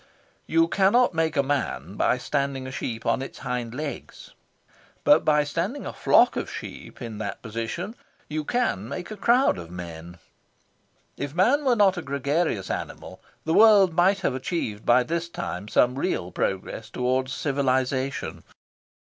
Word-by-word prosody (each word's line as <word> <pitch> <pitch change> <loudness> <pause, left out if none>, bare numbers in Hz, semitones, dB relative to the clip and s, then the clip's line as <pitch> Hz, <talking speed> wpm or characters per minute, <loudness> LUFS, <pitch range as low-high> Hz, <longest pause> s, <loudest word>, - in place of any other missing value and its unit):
You 165 0 +3
cannot 200 +7 +3
make 160 -1 0
a 140 - +4
man 115 - -2
by 125 - +2
standing 140 0 -2
a 130 - -6
sheep 120 -4 -5
on - - +1
its 135 - -7
hind 125 -1 -4
legs. 150 +1 -7 0.7
But 150 - +5
by 150 -1 +3
standing 170 - -3
a - - -5
flock - - +4
of - - -3
sheep - - -8
in 110 -3 -6
that 105 -2 -5
position 115 - -4 0.3
you 155 0 -3
can 145 - -1
make 175 +8 -6
a - - -4
crowd 240 - +3
of 85 -1 -9
men. 85 -1 -8 1.0
If 140 +1 -5
man 250 +11 +3
were 250 -2 +4
not 195 -4 +4
a - - -2
gregarious 140 - -1
animal, - - -6 0.2
the 160 - +1
world 205 -5 +6
might 190 +3 +3
have 155 - 0
achieved, 130 - -3
by 125 +1 +5
this 170 +4 -3
time, 100 - -5
some 125 +3 +3
real 90 - -1
progress 95 +4 -3
towards 130 +2 -1
civilisation. 135 -1 -1
140 Hz, 155 wpm, -25 LUFS, 120-175 Hz, 1.0 s, world